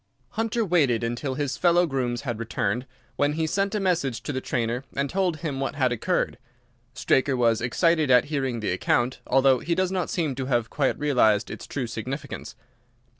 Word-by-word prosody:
"Hunter 225 +1 -1
waited 145 - +2
until 120 +3 -2
his 145 -1 -2
fellow 175 0 +4
grooms 125 -5 -2
had 120 -6 -4
returned, 115 +2 -2 0.3
when 145 +1 +2
he 160 +1 0
sent 195 +5 0
a - - +1
message 165 - 0
to 145 - -3
the 130 - -2
trainer 120 +1 -2
and 140 +1 0
told 180 0 0
him 150 -4 -4
what 135 +1 -2
had 130 -4 +2
occurred. 120 - -1 0.6
Straker 135 0 +2
was 115 -2 +2
excited 155 +4 +2
at 125 -1 +6
hearing 135 -6 -2
the 105 - -1
account, 120 +7 +1
although 135 0 +4
he 170 - -1
does 185 0 +1
not 185 -3 -1
seem 160 -6 -1
to 130 0 -4
have 120 -4 0
quite 140 -3 +1
realized 115 -8 +2
its - - -8
true 135 -3 -3
significance. 130 +5 -6
135 Hz, 185 wpm, -25 LUFS, 120-160 Hz, 0.6 s, at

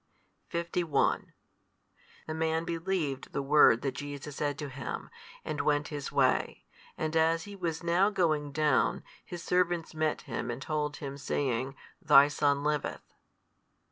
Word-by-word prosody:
51 170 -3 0 0.9
The 155 - -4
man 160 +1 0
believed 165 -5 -2
the 140 - -1
word 140 -5 +5
that 135 - 0
Jesus 145 +2 -7
said 145 -2 -1
to 145 -1 -5
him, 135 +1 -6 0.3
and 155 -1 -2
went 145 0 +1
his 145 -3 -5
way. - - +1 0.3
And 155 0 -2
as 165 +1 +3
he 205 0 -9
was 170 -3 -3
now 175 +4 +3
going 155 -7 0
down, 150 -2 +2 0.2
his 175 -1 -8
servants 175 -2 +1
met 155 -1 0
him - - -4
and 120 +1 -3
told 150 +1 -2
him, 140 -1 -6
saying, 135 -1 -1 0.3
Thy 145 -4 +7
son 140 -1 +1
liveth. 150 -1 -2
150 Hz, 140 wpm, -30 LUFS, 145-165 Hz, 0.9 s, Thy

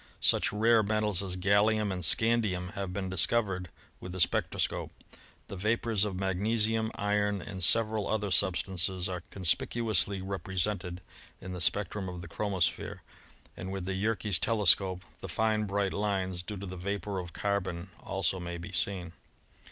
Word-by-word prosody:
Such - - +4
rare 115 +2 +4
metals 105 -2 +1
as 95 -2 -4
gallium 100 +2 +3
and 90 -1 -4
scandium 105 -2 +3
have 100 -3 -4
been 95 0 -3
discovered 95 -1 +2 0.3
with 90 - -7
the 95 - -5
spectroscope. - - 0 0.6
The - - -7
vapors 110 +1 +1
of 100 -3 -3
magnesium, 110 +4 0
iron 105 0 +1
and 95 0 -5
several 110 +2 +4
other 105 -2 -1
substances 95 0 +1
are 90 -2 -4
conspicuously 100 +2 +1
represented 95 -1 -2 0.4
in 95 - -7
the 90 - -4
spectrum 100 +1 +1
of 90 -1 -7
the 85 - -8
chromosphere, 95 0 -1 0.5
and 95 +1 -6
with 95 -2 -4
the 95 - -2
Yerkes 100 -1 0
telescope 95 -4 +3 0.2
the 95 - -7
fine 110 +3 +1
bright 100 -1 0
lines 95 -3 -1
due 105 +3 -6
to 100 - -6
the 95 -1 -7
vapor 100 +1 -3
of 90 -2 -6
carbon 95 -2 -2
also 95 -1 -1
may 85 0 -5
be 85 +3 -8
seen. 90 -1 -2
95 Hz, 150 wpm, -30 LUFS, 90-105 Hz, 0.6 s, Such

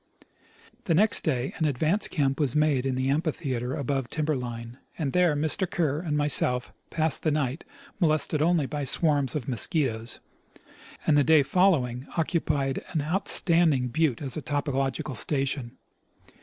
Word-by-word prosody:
The 165 - +2
next 210 +5 +3
day 130 -5 -1
an 160 - 0
advance 155 +8 +1
camp 140 -4 -1
was 140 -4 +1
made 150 -4 +2
in 130 - -1
the 130 +1 -1
amphitheatre 140 -5 -2
above 135 -2 -2
timber 155 -1 -1
line, 120 -1 -6 0.2
and 145 -5 -2
there 180 -4 +3
Mr. 155 +5 +1
Kerr 150 -4 0
and 155 -3 -2
myself 125 -4 +2 0.2
passed 160 -2 0
the 155 - +1
night, 145 -1 -1 0.4
molested 155 -3 +1
only 165 -2 +2
by 145 +1 -4
swarms 145 -1 +1
of 140 -5 -3
mosquitoes, 120 -2 +1 0.9
and 155 - +3
the - - +4
day 155 -1 +5
fol 185 +7 +4
lowing 125 -3 -3
occupied 150 -5 -1
an 155 -4 0
outstanding 165 -5 +1
butte 145 -1 0
as 135 -3 -2
a 155 - -4
topographical 135 -2 -2
station. 135 -1 -2
145 Hz, 155 wpm, -26 LUFS, 130-160 Hz, 0.9 s, day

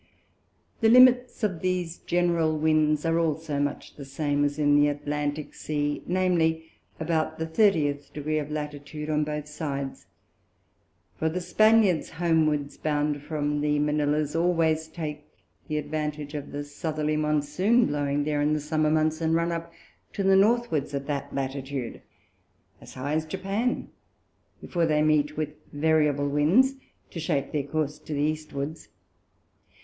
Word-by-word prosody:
The 225 - +4
Limits 250 0 +6
of 185 -6 0
these 180 -2 -2
general 170 -3 +1
Winds 155 -1 +2
are 165 0 +2
also 160 -2 -1
much 145 0 -3
the 145 - -7
same 145 +1 -1
as 145 0 0
in 145 -1 +3
the 145 0 +5
Atlantick 145 +1 -3
Sea, 145 -1 -2
viz. 175 -3 +2 0.4
about 160 -1 -1
the 160 - -2
thirtieth 160 -5 +1
Degree 155 +1 -2
of 150 -1 -5
Latitude 150 0 -5
on 150 0 +2
both 150 0 -4
sides; 140 -3 -5 1.1
for 160 - +1
the 175 +3 -2
Spaniards 215 -2 +3
homewards 155 -4 +1
bound 150 -1 -1
from 145 -1 -2
the 150 0 +1
Manilha's, 150 0 0
always 165 -2 +2
take 150 -2 -6 0.4
the 155 - -2
advantage 150 -1 -3
of 145 -1 -6
the 145 0 -4
Southerly 155 +1 -2
Monsoon, 155 +10 +2
blowing 145 0 0
there 150 0 0
in 150 +1 +2
the 155 - 0
Summer 155 +1 0
Months, 155 +1 +1
and 160 0 +2
run 170 +1 +1
up 170 0 -4 0.4
to 200 - -2
the 195 0 +5
Northwards 195 - +2
of 140 0 -3
that 145 -1 -3
Latitude, 135 -2 -4 0.8
as - - -13
high 140 +3 -3
as 155 0 +1
Japan, 195 +8 -2 0.7
before 170 -2 0
they 150 -1 +2
meet 150 -1 +2
with 155 -1 -1 0.2
variable 150 -1 +2
Winds, 160 - +3 0.4
to 170 - -6
shape 145 -4 -1
their 150 - 0
Course 150 0 -2
to 155 - -7
the 145 - -1
Eastwards. 155 0 -3
155 Hz, 150 wpm, -26 LUFS, 145-165 Hz, 1.1 s, Limits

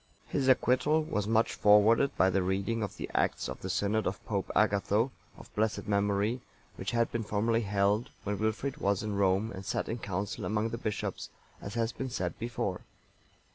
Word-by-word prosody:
(923) - - +2
His 135 - 0
acquittal 130 +4 +3
was 105 -10 -2
much 110 +1 +2
forwarded 105 +6 +5
by 95 +1 +4
the 95 +1 +2
reading 95 +5 -1
of 105 - -4
the - - -4
acts - - +1
of - - -7
the 95 - -4
synod 100 +3 +1
of 95 0 -4
Pope 100 -3 -2
Agatho,(924) 105 +3 +2 0.3
of - - -18
blessed 110 0 0
memory, 105 +3 +1 0.3
which 95 - -4
had 115 +1 +1
been 115 - -1
formerly 110 +2 +1
held, 100 +3 +1
when 105 -1 -2
Wilfrid 110 +6 -1
was 100 -6 0
in 105 -1 -2
Rome 100 +3 +2
and 95 0 -7
sat - - -2
in 115 - -3
council 100 -1 -3
among 110 +1 0
the 115 0 -5
bishops, 105 -3 -3 0.3
as 100 - -7
has 115 0 0
been 130 +1 -5
said 90 -8 -3
before. 115 0 -3
105 Hz, 190 wpm, -30 LUFS, 100-115 Hz, 0.3 s, forwarded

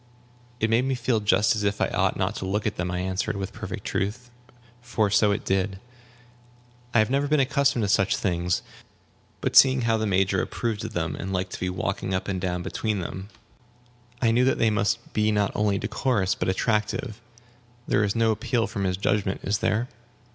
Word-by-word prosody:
"It 110 0 +1
made 120 +3 +3
me 135 0 0
feel 120 -2 0
just 105 +1 +3
as 110 - -2
if 100 0 0
I - - +2
ought - - 0
not - - 0
to - - -4
look 105 +2 -1
at 105 - -1
them," 90 0 -2
I 90 - -2
answered, 95 +1 -2
with 95 -1 -5
perfect - - -7
truth, 120 +5 -3 0.5
for 110 -4 0
so 105 0 +4
it 100 - -2
did; 95 0 0 1.1
"I 120 - +1
have 110 +1 +3
never 140 +1 +1
been 150 0 +2
accustomed 140 -2 +2
to - - +1
such 100 +1 +2
things. 90 -2 0 0.8
But - - -2
seeing 130 -1 +7
how 115 -1 +2
the 110 0 -1
Major 95 -1 +2
approved 110 -4 -3
of 110 0 -6
them, 85 -2 -2
and 95 - -5
liked 90 0 -2
to - - -6
be 90 - -1
walking 95 +1 -2
up 95 - -3
and 95 -2 -2
down 90 -1 -2
between 110 +2 -2
them, 95 +2 -6 0.9
I 115 - +4
knew 120 +2 +3
that 130 - +2
they 115 - +3
must 115 +2 -1
be 110 0 +2
not 105 -1 +1
only 105 -1 +1
decorous, 105 -2 0
but - - -2
attractive. 105 +3 -1 0.7
There 105 - +2
is 100 +1 0
no 115 -1 +3
appeal 115 +1 0
from 100 - -3
his 90 -1 0
judgment, 100 0 0
is 100 +1 0
there?" 115 +4 0
105 Hz, 205 wpm, -25 LUFS, 95-115 Hz, 1.1 s, seeing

